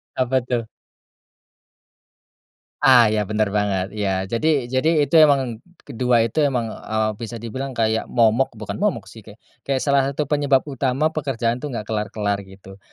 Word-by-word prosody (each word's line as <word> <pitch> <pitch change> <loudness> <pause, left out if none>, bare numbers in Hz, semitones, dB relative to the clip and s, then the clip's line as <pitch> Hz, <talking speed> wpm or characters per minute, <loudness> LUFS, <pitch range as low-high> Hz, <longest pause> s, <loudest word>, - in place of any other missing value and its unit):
Apa 130 0 +1
tuh? 125 -2 -1 2.2
Ah 125 -5 +6
iya 105 -2 -1
benar 105 -1 0
banget, 100 -2 0
iya. 95 -3 -1
Jadi 115 +7 0 0.2
jadi 150 +3 +2
itu 140 - -5
emang, 135 -7 +3 0.2
kedua 120 0 +1
itu 115 +6 -2
emang, 125 -7 0
eee, 110 0 -2
bisa 115 0 -6
dibilang 130 +4 -6
kayak 110 -1 0
momok 120 +2 +2
bukan 105 - -6
momok 205 0 0
sih 115 - -13
kayak 105 0 -14 0.3
kayak 135 -2 0
salah 140 -1 +3
satu 140 +2 -2
penyebab 145 -2 +2
utama 140 +2 -1
pekerjaan 125 -6 -2
tuh 150 - -5
nggak 110 - -3
kelar-kelar 105 -1 -2
gitu. 95 0 -14
120 Hz, 155 wpm, -21 LUFS, 110-135 Hz, 2.2 s, Ah